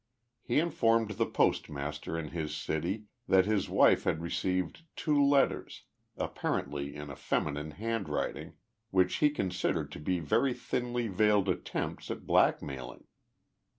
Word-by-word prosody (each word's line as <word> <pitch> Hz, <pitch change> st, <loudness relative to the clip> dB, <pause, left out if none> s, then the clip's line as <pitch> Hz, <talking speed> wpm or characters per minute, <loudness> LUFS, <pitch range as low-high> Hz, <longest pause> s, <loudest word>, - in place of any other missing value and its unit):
He 120 Hz, -, -1 dB
informed 115 Hz, -9 st, +2 dB
the 110 Hz, +2 st, 0 dB
postmaster 75 Hz, +3 st, -1 dB
in 80 Hz, -2 st, -4 dB
his 80 Hz, -2 st, -3 dB
city 85 Hz, +7 st, -2 dB, 0.2 s
that 95 Hz, -1 st, +5 dB
his 105 Hz, -2 st, 0 dB
wife -, -, +5 dB
had 80 Hz, -, 0 dB
received 90 Hz, -, -2 dB
two 145 Hz, -2 st, +2 dB
letters, 140 Hz, -1 st, +2 dB, 0.3 s
apparently 70 Hz, 0 st, -2 dB
in 75 Hz, -1 st, -7 dB
a -, -, -7 dB
feminine 75 Hz, +3 st, -1 dB
handwriting, 110 Hz, +5 st, -3 dB, 0.4 s
which 90 Hz, -1 st, +2 dB
he 150 Hz, -, +4 dB
considered 95 Hz, -10 st, -1 dB
to -, -, -7 dB
be 90 Hz, +5 st, 0 dB
very 120 Hz, -, +1 dB
thinly 120 Hz, -1 st, -2 dB
veiled 105 Hz, 0 st, +3 dB
attempts 90 Hz, -, -3 dB
at -, -, -5 dB
blackmailing. 65 Hz, -4 st, +1 dB
95 Hz, 130 wpm, -31 LUFS, 75-115 Hz, 0.4 s, that